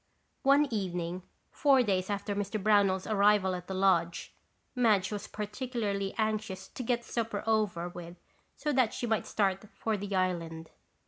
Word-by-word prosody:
One 280 +2 +5
evening, 180 -3 -2 0.3
four 275 -3 +4
days 190 -3 0
after 205 0 -2
Mr. 205 +2 -2
Brownell's 200 -2 +3
arrival 205 -2 +3
at 180 -1 -6
the 190 - -4
lodge, 175 -3 +1 0.4
Madge 215 -7 +3
was 205 -1 -4
particularly 210 -2 -3
anxious 215 -4 -2
to - - -7
get 240 -1 -1
supper 225 -3 -2
over 210 -6 +1
with 175 -1 -9 0.4
so 300 -1 -2
that 255 -4 +2
she - - -2
might 220 -2 0
start 195 -2 0
for 220 -1 -1
the 200 0 -4
island. 165 -3 -2
205 Hz, 150 wpm, -30 LUFS, 185-220 Hz, 0.4 s, One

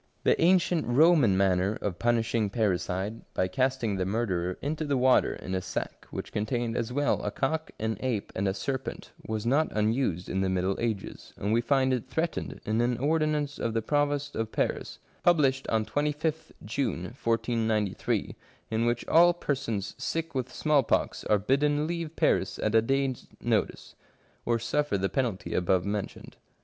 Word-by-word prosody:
The - - +3
ancient 175 -1 +3
Roman 135 - +5
manner 95 +1 +2
of 90 -4 -3
punishing 115 -2 +1
parricide, 100 0 -1
by 95 - +1
casting 120 0 0
the 95 - 0
murderer 95 -4 -1
into 155 +2 -2
the 145 -3 0
water 130 0 +4
in 95 - -6
a 95 - 0
sack - - -5
which - - -6
contained 115 +2 -1
as 115 0 -2
well 145 +3 +1
a 105 - -1
cock, 155 +9 -2
an 110 -1 -2
ape, 120 -5 -2
and 95 +1 0
a 95 - +1
serpent, 130 +6 -4 0.2
was 110 0 -3
not 145 +6 +3
unused 105 -4 0
in 95 - -1
the 95 - +1
middle 95 +1 0
ages, 110 -4 -4
and 105 +2 -1
we 115 - +3
find 130 +1 +2
it 125 -3 -3
threatened 165 0 -2
in 110 +2 +1
an 120 0 +1
ordinance 150 +1 0
of 115 -1 -2
the 115 - +2
Provost 145 0 0
of 110 0 -2
Paris, - - -2 0.2
published 140 -6 +3
on 110 -1 +1
25th 150 +3 -1 0.2
June 110 -5 -1 0.2
1493, 115 -3 0 0.4
in 115 +1 +1
which 120 0 -1
all 175 +2 +6
persons 115 - -2
sick 165 0 -3
with 130 -2 -2
smallpox 150 -3 +1
are 105 - +4
bidden 145 +7 +1
leave 165 -1 -4
Paris - - +1
at 110 - -1
a 110 - +6
day's 135 +1 -1
notice, - - -1 0.5
or 120 0 +3
suffer 130 +1 0
the 95 0 0
penalty 120 -8 -2
above 90 0 +2
mentioned. 100 0 -5
120 Hz, 165 wpm, -28 LUFS, 105-145 Hz, 0.5 s, all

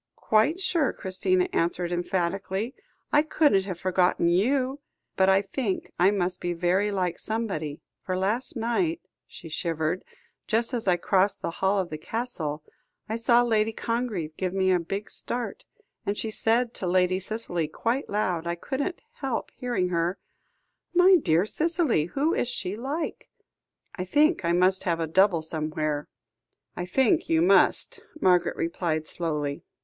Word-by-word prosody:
"Quite 225 +11 +2
sure," 335 -7 +1
Christina 365 - 0
answered 175 +1 0
emphatically. 190 +5 -1 0.4
"I 295 - +7
couldn't 295 -10 +3
have 185 -3 -5
forgotten 180 -2 +2
you. 255 +9 +1 0.4
But 190 0 +4
I 195 +1 +4
think 200 0 -3
I 180 +2 +6
must 185 -3 -1
be 175 0 -1
very 180 +4 +1
like 180 -3 -1
somebody, 190 -10 -3 0.2
for 185 -1 -2
last 210 +9 -1
night" 290 +9 0 0.3
she 165 - -11
shivered 165 +2 -2 0.4
"just 230 +3 0
as 235 -4 -2
I 180 -1 +4
crossed 195 +2 +1
the - - -1
hall 190 +4 +1
of 185 -4 -1
the 155 - -5
Castle, 160 -8 -4 0.4
I 220 - -2
saw 235 +1 +4
Lady 220 -2 +2
Congreve 220 -9 -3
give 185 0 -2
a 190 -1 +3
big 195 +5 -5
start, 245 - -4 0.4
and 205 -1 -2
she 220 - -3
said 230 +2 +1
to 185 - -4
Lady 185 +1 +2
Cicely 190 -5 -2
quite 235 - -2
loud, 180 -5 -1
I 170 - -1
couldn't 280 - -3
help 265 -4 -3
hearing 240 -8 -1
her 170 +2 0 0.8
'My 365 +1 +7
dear 175 - +2
Cicely, 315 - +1
who 280 - 0
is - - 0
she 200 -5 -3
like?' 280 +8 -4 0.6
I 185 - -4
think 300 - +3
I 170 - +1
must 185 +2 +3
have 170 -2 +1
a 165 - 0
double 175 0 +3
somewhere." 155 -2 -2 0.7
"I 180 - -4
think 260 +4 +2
you 165 0 +3
must," 190 +1 +3 0.2
Margaret 180 - +3
replied 165 -2 -1
slowly. 150 -4 -3
190 Hz, 155 wpm, -26 LUFS, 175-235 Hz, 0.8 s, I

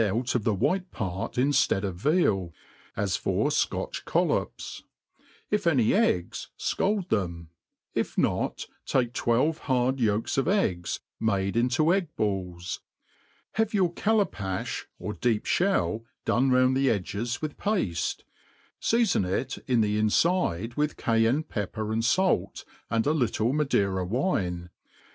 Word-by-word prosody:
out 115 +5 0
of 120 - 0
the 110 - +2
white 185 - 0
pare 95 - -3
inftead 130 -6 +2
of 95 -3 -2
veal, 100 - +1 0.5
as 100 -2 0
for - - 0
Scotch - - -1
coll - - +1
ops: - - -3 0.7
if 205 -4 +1
any 130 -9 +4
eggs, 145 - +1
fcald 195 -2 0
them; 85 -5 -2 0.4
if - - -2
not, - - 0 0.2
take 120 -3 +1
twelve 130 +7 +1
hard, 130 0 +1
yolks 110 +2 +1
of 135 - 0
eggs, 95 - 0 0.2
made 100 -2 0
into 130 +8 +3
egg 190 -3 +1
balls; 90 -4 -2 0.7
have 220 -1 0
your 180 -4 +2
callapafti 170 - -1
or 105 - -4
deep 115 -2 0
ftiell 175 - +1 0.2
done 130 +2 +2
round 130 0 +4
the 135 0 +3
edges 110 +4 -2
with 155 -2 -4
pafte, 175 - -1 0.6
feafon 230 - +2
it 95 +8 -2
in 125 -3 +3
the 105 0 +1
infide 115 - +1
with 150 +3 -1
Cayeunc 115 +6 +2
pepper 110 +1 -3
and 115 +1 0
fait, 185 +11 +1 0.2
and 115 0 +1
a 150 - +3
little 120 -4 +1
Madeira 100 -11 +1
wine 90 - -1
120 Hz, 135 wpm, -27 LUFS, 100-155 Hz, 0.7 s, any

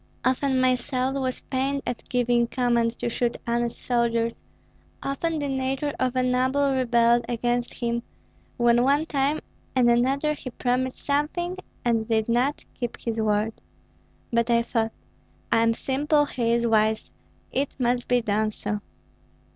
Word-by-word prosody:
Often 260 +1 +2
my 255 0 +4
soul 255 0 -1
was 255 -1 -3
pained 275 +1 -1
at 245 - -5
giving 240 -1 +2
command 235 -1 +1
to - - -2
shoot 235 0 -1
honest 235 0 -1
soldiers; 235 -1 +1 0.7
often 315 +4 -1
the 290 -1 -2
nature 270 +2 -1
of 255 0 0
a 255 - +2
noble 260 +2 +2
rebelled 240 -2 +3
against 240 0 0
him, 235 -1 -1 0.6
when 240 -1 +4
one 285 +4 +3
time 285 0 0 0.3
and 250 -2 +4
another 270 +5 +2
he 275 - -7
promised 255 +1 -1
something 315 +6 0 0.3
and 225 -2 +1
did 220 -2 +1
not 250 +5 +1
keep 240 -2 -5
his 225 -1 -2
word. 215 +1 +1 0.8
But 235 0 +2
I 235 0 +4
thought: 225 -1 0 0.6
'I - - +4
am 230 0 +3
simple, 290 +5 +1
he 235 -4 -1
is 235 0 +2
wise! 220 -1 +2 0.4
it 275 +1 0
must 245 -1 0
be 245 -1 +3
done 215 0 +1
so.' 210 0 -3
245 Hz, 150 wpm, -25 LUFS, 235-270 Hz, 0.8 s, my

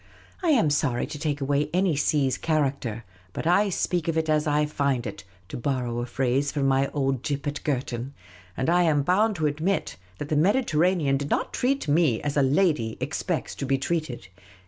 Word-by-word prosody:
I 350 - +1
am 230 - +4
sorry 140 -4 0
to 150 - -8
take 145 -2 -2
away 145 +2 0
any 185 -3 +2
sea's 140 -2 +1
character; 135 -8 -1 0.3
but - - -5
I 200 +5 +3
speak 175 -2 -1
of 165 -1 0
it 160 0 0
as 155 0 +2
I 150 0 +2
find 140 -4 -1
it 105 - -6 0.3
(to - - -5
borrow 125 -2 -2
a 120 - -3
phrase 135 +3 0
from 145 -2 -1
my 135 0 +2
old 135 -3 -1
gyp 140 0 -3
at 145 0 -4
Girton); 130 -1 -3 0.4
and 130 - -1
I 175 +2 +4
am 155 -4 +2
bound 205 +7 +2
to 155 -3 -1
admit 155 +7 -1 0.2
that 145 - -6
the 155 - +1
Mediterranean 165 - +2
did 140 +1 -4
not - - -1
treat 270 - 0
me 145 -6 +3
as 145 -1 -2
a 145 - +3
lady 140 -5 +1
expects - - -3
to - - -5
be 135 0 +2
treated. 135 - -3
145 Hz, 195 wpm, -25 LUFS, 135-165 Hz, 0.4 s, am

